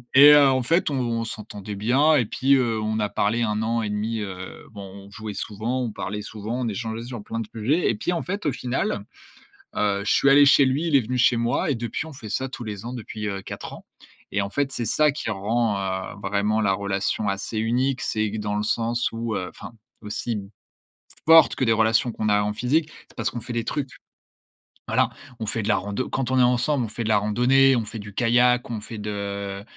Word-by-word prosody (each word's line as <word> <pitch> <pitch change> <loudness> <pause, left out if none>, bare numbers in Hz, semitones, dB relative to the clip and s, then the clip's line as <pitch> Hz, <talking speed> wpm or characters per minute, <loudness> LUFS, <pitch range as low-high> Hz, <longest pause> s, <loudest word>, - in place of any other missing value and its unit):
et 145 +2 +10
heu, 145 -1 +7
en 130 -1 +1
fait, 165 +5 +2
on 120 -4 -1
s'entendait 105 -2 -7
bien, 130 +10 +3
et 125 -5 +3
puis, 135 +6 +2
heu, 120 -4 +1
on 110 0 -1
a 105 -1 0
parlé 115 +4 0
1 105 -1 -1
an 115 +1 0
et 105 - -2
1/2, 110 +2 -2
heu, 95 -2 -7
bon, 100 -2 -9 0.2
on 100 - -14
jouait 110 -1 -7
souvent, 115 +5 -3
on 115 - -3
parlait 105 +1 -5
souvent, 110 +4 -5
on 120 - -1
échangeait 110 +2 -4
sur 120 -4 -7
plein 115 - -5
de 115 - -4
sujets, 130 +10 +1
et - - -2
puis 210 -4 -2
en 170 - -2
fait, 200 +1 -4
au - - +2
final, 125 -5 -2 0.7
heu, 100 -1 0
je - - +1
suis 140 - +4
allé 145 +1 +7
chez 140 0 +6
lui, 140 +6 0
il 155 - +2
est 135 - +6
venu 125 +3 -3
chez 120 0 +4
moi 120 +9 0
et 140 - +1
depuis, 120 +5 -4
on 160 - -10
fait 110 -5 -9
ça 130 +5 -1
tous 120 - -7
les 105 0 -6
ans, 120 - -5
depuis, 110 -3 -6
heu, 100 -1 -3
4 - - -8
ans, - - -12 0.5
et 100 - 0
en 100 - -3
fait, 140 +3 -1
c'est 120 -3 -3
ça 150 +7 +3
qui 140 -4 -5
rend, 105 +1 0
heu, 95 -1 -3
vraiment 105 +2 +1
la 100 -2 +2
relation 100 +1 -1
assez 100 +3 -3
unique. 125 +4 0
C'est 110 -1 -1
que 110 - -4
dans 105 -1 -2
le 105 - -1
sens 115 +2 0
où, 115 -1 -3
heu, 90 -2 -3
enfin - - -11 0.3
aussi 105 +3 -4
m 100 -2 -6 0.8
forte 165 0 +7
que - - +1
des 115 - +3
relations 115 +2 +2
qu'on 110 0 -2
a 105 0 +3
en 105 0 -1
physique, 150 +8 0 0.2
c'est - - -21
parce - - -1
qu'on 120 - -5
fait 120 - -7
des 115 -1 -1
trucs. 140 -3 -3 1.0
Voilà, - - +2 0.3
on 110 - -3
fait 110 - -2
de 105 - -2
la - - +4
rando 100 +6 -3
quand 130 -1 -2
on 130 - +1
est 125 - +6
ensemble, 125 +3 +2
on - - -7
fait 115 +2 -4
de 110 - -1
la 105 - +4
randonnée, 125 +5 +4
on 115 - -1
fait 110 +1 -7
du 105 -1 -9
kayak, 125 +2 +3
on 115 -3 -4
fait 110 +1 -8
de 100 -1 -4
115 Hz, 240 wpm, -24 LUFS, 105-125 Hz, 1.0 s, et